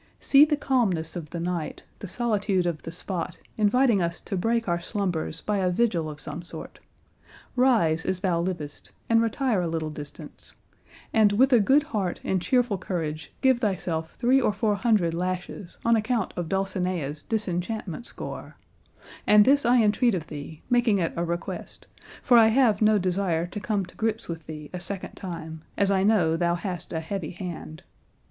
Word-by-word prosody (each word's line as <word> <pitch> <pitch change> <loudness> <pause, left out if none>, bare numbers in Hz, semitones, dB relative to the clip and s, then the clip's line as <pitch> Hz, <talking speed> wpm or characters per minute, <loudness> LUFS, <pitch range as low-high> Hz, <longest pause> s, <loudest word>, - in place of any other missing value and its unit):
See 280 +2 +6
the 300 -1 0
calmness 195 - 0
of 165 -4 -6
the 170 - -5
night, 170 -2 -3 0.2
the 200 - -6
solitude 205 -3 0
of 170 -3 -2
the 165 - -7
spot, 175 0 -4 0.2
inviting 220 0 +3
us 170 0 -1
to 200 - -4
break 230 +4 0
our 170 -1 0
slumbers 175 -5 -2
by 210 -1 -1
a 185 -1 +2
vigil 180 -5 +1
of 150 -1 -8
some 155 +3 -6
sort. 175 - -9 0.8
Rise 220 -12 +3
as 185 -1 -2
thou 175 -3 +1
livest, 170 -5 -5 0.2
and 230 0 +5
retire 230 -2 +1
a 175 - -1
little 160 -1 -2
distance, 150 -1 -10 0.6
and 215 -3 +5
with 260 +5 +4
a 240 - +7
good 270 +8 +4
heart 205 - -2
and 190 -2 0
cheerful 245 -3 +1
courage 160 -4 -4
give 260 -2 +4
thyself 175 -7 -2
three 260 +2 +3
or 230 - +2
four 210 +1 0
hundred 200 -5 +2
lashes 180 +1 -4
on 230 0 +5
account 225 -1 0
of 175 -2 -3
Dulcinea's 185 -6 -2
disenchantment 210 0 -3
score; - - -7 0.7
and 210 0 +7
this 280 -2 +4
I 240 -1 +5
entreat 215 +1 +3
of 165 -3 -4
thee, 150 0 -9
making 240 -4 +3
it 170 -3 -1
a 170 - -1
request, 170 0 -5 0.4
for 240 -2 +6
I 225 - +7
have 225 -3 +3
no 215 0 +5
desire 180 -3 0
to 180 +4 -6
come 205 -2 -1
to - - -17
grips 225 0 -2
with 165 -2 -6
thee 150 -2 -8
a 180 - -4
second 195 +1 -6
time, 160 -4 -7 0.2
as 200 -1 +2
I 190 -1 +3
know 190 -6 +3
thou 170 0 +1
hast 175 -1 -5
a 160 - -2
heavy 170 -1 -4
hand. 170 -3 -7
190 Hz, 180 wpm, -26 LUFS, 170-225 Hz, 0.8 s, a